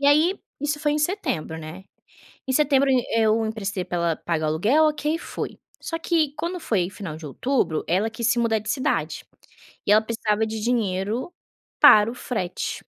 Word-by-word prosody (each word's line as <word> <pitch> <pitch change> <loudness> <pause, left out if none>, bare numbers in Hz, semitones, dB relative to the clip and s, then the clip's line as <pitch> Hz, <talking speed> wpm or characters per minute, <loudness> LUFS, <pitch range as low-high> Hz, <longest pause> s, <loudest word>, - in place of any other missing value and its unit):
E 280 - +2
aí 315 +7 +4 0.2
isso 295 +1 -1
foi 295 -1 +1
em 300 - 0
setembro, 295 - -2
né, 160 +4 -9 0.6
em - - 0
setembro 275 -1 +3
e 255 -2 +2
eu 220 0 +3
emprestei 205 -4 -3
para 175 - -3
ela 170 -1 +1
pagar 160 -2 -2
o - - +1
aluguel, 220 - +3
ok 300 +1 0
e - - -5
foi. - - -6 0.2
Só 330 - -4
que 325 -4 +1
quando 355 +2 -3
foi 200 - 0
final 190 -6 -7
de 160 - -10
outubro, 200 - -1
ela 195 +6 +1
quis 225 +1 -4
se 240 0 +2
mudar 230 -2 +2
de 215 - -8
cidade 260 - -1 0.6
e 205 - +4
ela 215 - +6
precisava 220 -1 -1
de 220 0 -4
dinheiro 220 - -1 0.5
para 210 +1 +8
o - - -9
frete. 215 -8 -3
225 Hz, 190 wpm, -24 LUFS, 190-290 Hz, 0.6 s, para